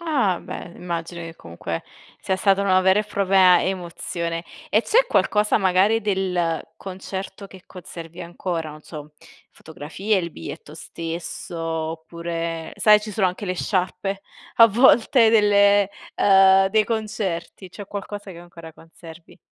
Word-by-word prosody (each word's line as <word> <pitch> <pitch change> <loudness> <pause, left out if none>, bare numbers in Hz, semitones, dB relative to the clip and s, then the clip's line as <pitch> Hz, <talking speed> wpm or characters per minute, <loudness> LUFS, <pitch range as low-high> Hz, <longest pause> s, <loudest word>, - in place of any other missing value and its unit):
Ah, 260 - 0
beh, 175 - -8
immagino 170 0 -5
che 165 0 -9
comunque 85 0 -6 0.4
sia 190 - -1
stata 195 0 +2
una 185 -1 +3
vera 190 +2 +4
e 215 - -5
propria 190 -3 +4
emozione. 170 -2 -4 0.3
E 215 - +3
c'è - - +3
qualcosa 210 +1 +2
magari 195 +3 +3
del 185 -5 -1 0.2
concerto 190 +1 -7
che 190 -1 -15
conservi 170 -2 -10
ancora? 170 -2 -4
Non 155 0 -13
so, 150 -1 -10 0.4
fotografie, 160 +7 -3
il 170 -2 -4
biglietto 80 - -9
stesso 165 +1 -7
oppure, 165 0 -4
sai, 210 -1 +5
ci 215 0 -7
sono 195 -1 +1
anche 180 +3 -7
le 185 - -2
sciarpe 195 +1 -2 0.3
a 230 - +9
volte 230 0 +4
delle 205 -2 +4 0.3
uhm 195 -1 +5 0.2
dei 215 +1 +2
concerti, 205 -5 -4
c'è 190 +3 -10
qualcosa 205 0 -7
che 170 - -12
ancora 170 -2 -12
conservi? 165 +1 -15
185 Hz, 140 wpm, -22 LUFS, 170-205 Hz, 0.4 s, a